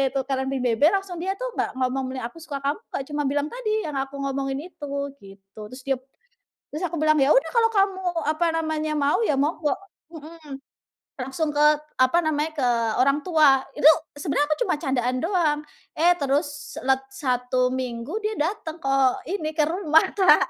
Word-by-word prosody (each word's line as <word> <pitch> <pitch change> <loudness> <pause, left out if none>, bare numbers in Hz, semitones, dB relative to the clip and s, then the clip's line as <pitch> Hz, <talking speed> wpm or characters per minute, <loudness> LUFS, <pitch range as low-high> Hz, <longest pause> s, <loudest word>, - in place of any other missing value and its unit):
tukeran 265 0 -1
pin 265 -2 -2
BB 230 -3 +1 0.2
langsung 390 -3 -4
dia 385 +2 -1
tuh - - -4
nggak - - 0
ngomong, 260 0 -1
"Aku 330 - -14
suka 285 -3 -5
kamu," 285 +6 -1
nggak, 270 - -3
cuma 295 0 -1
bilang 290 +1 0
tadi 435 -3 -1
yang 300 -2 -4
aku 270 +1 -4
ngomongin 275 0 -2
itu, 290 - -8 0.3
gitu. 195 +1 -14
Terus 255 +2 -11
dia 270 -1 +1 0.7
terus 305 +4 -5
aku 340 0 -5
bilang, 310 0 +4
"Ya 275 +1 +4
udah - - +3
kalau 460 -2 +3
kamu 390 -1 +1 0.3
apa 315 +2 +1
namanya, 315 -1 -1
mau 285 0 +2
ya 295 - +2
monggo," 300 +1 +1 0.4
mhm. 310 -2 -10 0.6
Langsung 295 +4 -2
ke 290 - +1 0.4
apa 255 +6 +4
namanya, 310 0 0
ke 255 -3 +2 0.3
orang 275 +3 +3
tua, 305 -7 +5 0.2
itu - - -1 0.3
sebenarnya 290 -1 0
aku 305 - +1
cuma - - +1
candaan 255 -3 0
doang, 330 -5 +1 0.4
eh 345 +3 +5
terus 285 +1 -2
lat 265 0 +2
1 250 -1 0
minggu 255 - -4
dia 430 - 0
datang 330 -1 -3
ke 270 0 0 0.4
ini, 315 -5 -2
ke 315 - +2
rumah 320 -2 +3 0.2
Kak. 380 -2 +5
290 Hz, 175 wpm, -24 LUFS, 270-325 Hz, 0.7 s, tua